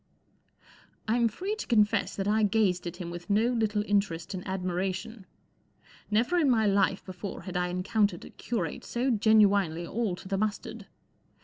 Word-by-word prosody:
I 220 - +2
'M 235 -1 +3
free 370 - -3
to - - -6
confess 215 -3 +2
that 195 0 -2
I 215 +1 +2
gazed 205 -4 +2
at 170 - -5
him 170 -2 -6
with 175 +3 -8
no 215 +4 +3
little 215 -3 0
interest 200 -4 0
and 185 - -4
admiration. 190 +3 -3 0.8
Never 230 +11 +2
in 300 -5 +3
my 225 -3 +3
life 195 -1 +2
before 185 +1 -7
had 185 - -7
I 180 0 +1
encountered 185 +1 0
a - - -12
curate 235 -1 -4
so 250 +2 -1
genuinely 205 -6 +3
all 210 0 -2
to 185 - -12
the 195 0 -1
mustard. 215 0 -3
205 Hz, 170 wpm, -28 LUFS, 185-220 Hz, 0.8 s, M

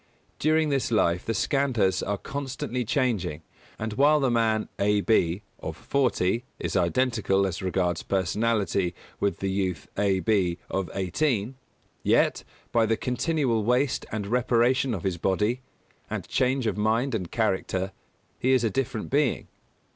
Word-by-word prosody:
During 155 0 +3
this 135 -2 0
life 90 -6 +2
the 115 - 0
Skandhas 115 -7 +1
are 100 0 -1
constantly 130 -1 -4
changing; 110 - -1 0.3
and 110 0 -3
while 145 +5 +4
the 135 -3 +2
man 110 -2 +1
A. 105 +1 +3
B., 95 -3 +2 0.2
of - - -6
forty, 120 -5 +1
is - - -3
identical, 115 -7 +2
as 95 -2 -3
regards 90 -2 0
personality, 100 -1 0 0.2
with 100 - -1
the 95 -1 0
youth 95 -2 -2
A. 100 -2 +2
B., 95 -3 +1
of 95 -3 -1
eighteen, 105 - 0 0.5
yet, - - +2 0.3
by 115 -1 +3
the 110 0 +1
continual 125 -3 0
waste 125 +4 +1
and 105 -2 -3
reparation 120 +2 +2
of 90 - -6
his 90 -3 -1
body, 105 +8 +1 0.5
and - - -4
change 130 0 +1
of 105 -2 0
mind 115 +5 +1
and 90 -6 -2
character, 95 -3 -1 0.5
he 130 +1 +3
is 130 -2 +3
a 115 - +1
different 125 -5 -2
being. 140 -1 +1
110 Hz, 145 wpm, -26 LUFS, 95-125 Hz, 0.5 s, while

